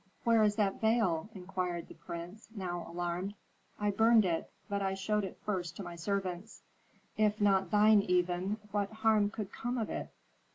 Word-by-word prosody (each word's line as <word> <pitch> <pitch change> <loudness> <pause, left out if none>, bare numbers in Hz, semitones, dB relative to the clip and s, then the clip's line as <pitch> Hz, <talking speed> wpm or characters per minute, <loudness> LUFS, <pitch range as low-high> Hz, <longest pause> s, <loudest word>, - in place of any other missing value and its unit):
"Where 230 -1 +4
is 210 -1 +3
that 205 -3 0
veil?" 220 -6 +2
inquired 180 -2 -3
the - - -11
prince, 170 +6 -8
now 175 -3 -4
alarmed. 175 +3 -3 0.4
"I 210 0 +1
burned 225 +1 +5
it, 165 -2 -1 0.2
but 200 -1 -1
I 195 0 0
showed 210 +2 0
it 190 - -6
first 180 -5 -2
to 200 - -5
my 175 -1 -7
servants." 190 +2 -3 0.5
"If 215 0 +2
not 195 -3 +3
thine 210 +1 +6
even, 180 +2 +1
what 205 0 0
harm 220 -2 +3
could 210 -2 -5
come 245 +1 -3
of 225 -3 -2
it?" - - -4
200 Hz, 170 wpm, -32 LUFS, 180-215 Hz, 0.5 s, thine